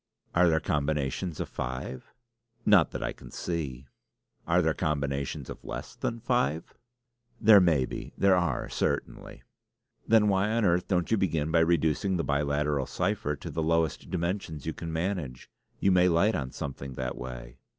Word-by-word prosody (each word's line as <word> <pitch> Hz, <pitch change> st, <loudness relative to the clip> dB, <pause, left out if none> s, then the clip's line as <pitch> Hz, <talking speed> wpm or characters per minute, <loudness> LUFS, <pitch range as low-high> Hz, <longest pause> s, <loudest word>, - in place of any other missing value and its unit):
"Are 85 Hz, 0 st, +5 dB
there 80 Hz, -1 st, +3 dB
combinations 75 Hz, +2 st, -1 dB
of -, -, -2 dB
five?" 65 Hz, 0 st, -5 dB, 0.5 s
"Not 100 Hz, -6 st, +6 dB
that -, -, -5 dB
I -, -, -2 dB
can -, -, -13 dB
see." 70 Hz, -7 st, -4 dB, 0.6 s
"Are -, -, +3 dB
there -, -, +2 dB
combinations 70 Hz, -2 st, -2 dB
of -, -, -9 dB
less -, -, -6 dB
than 115 Hz, -, -3 dB
five?" 120 Hz, -, 0 dB, 0.7 s
"There 105 Hz, -2 st, +8 dB
may 80 Hz, -8 st, +3 dB
be. -, -, -7 dB
There 100 Hz, -1 st, +5 dB
are 75 Hz, -10 st, 0 dB
certainly." -, -, -3 dB, 0.6 s
"Then 110 Hz, -1 st, +5 dB
why 100 Hz, +1 st, +2 dB
on 115 Hz, -2 st, +2 dB
earth 90 Hz, -1 st, +2 dB
don't 90 Hz, -1 st, 0 dB
you 110 Hz, -, +4 dB
begin 80 Hz, -5 st, 0 dB
by 85 Hz, -, +4 dB
reducing 85 Hz, +3 st, +2 dB
the 85 Hz, -, -1 dB
biliteral 70 Hz, -1 st, 0 dB
cipher 75 Hz, +1 st, -1 dB
to -, -, -8 dB
the 80 Hz, -, -2 dB
lowest 80 Hz, -1 st, 0 dB
dimensions 85 Hz, -3 st, -3 dB
you 80 Hz, -, -2 dB
can 80 Hz, +1 st, -6 dB
manage? 80 Hz, -6 st, -3 dB, 0.3 s
You 95 Hz, -, +3 dB
may 90 Hz, 0 st, +5 dB
light 90 Hz, +6 st, +3 dB
on 65 Hz, -8 st, -2 dB
something 70 Hz, 0 st, -6 dB
that 65 Hz, 0 st, -3 dB
way." -, -, -8 dB
80 Hz, 165 wpm, -28 LUFS, 70-90 Hz, 0.7 s, There